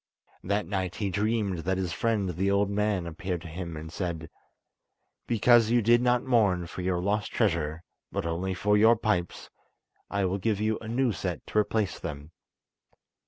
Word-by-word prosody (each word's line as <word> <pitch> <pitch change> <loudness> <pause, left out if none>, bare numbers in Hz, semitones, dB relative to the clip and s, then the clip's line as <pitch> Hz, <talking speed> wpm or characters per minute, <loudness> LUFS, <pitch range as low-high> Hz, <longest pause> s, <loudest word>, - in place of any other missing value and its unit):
That 100 +2 0
night 95 -1 -2
he 100 -3 -2
dreamed 105 -2 0
that 95 +3 -1
his 90 -2 -2
friend 110 0 0
the 95 +3 0
old 100 0 +2
man 105 -3 0
appeared 85 +1 -4
to - - -8
him 85 0 -6
and 80 +1 -8
said: 85 -4 -4 1.0
"Because 120 0 +5
you 120 -1 +3
did 120 +2 +5
not 125 0 +2
mourn 105 -9 +2
for 85 +1 -7
your 90 0 0
lost 100 +2 -1
treasure, 85 -6 0 0.3
but - - -2
only 90 +3 -2
for 105 +3 +2
your 110 +3 +6
pipes, 105 -6 -2 0.6
I 100 -1 0
will 95 +2 -1
give 105 0 0
you 110 +1 0
a 110 - -9
new 120 +2 +1
set 90 -5 -4
to 105 - 0
replace 105 -1 0
them." 75 -1 -7
100 Hz, 175 wpm, -28 LUFS, 90-110 Hz, 1.0 s, your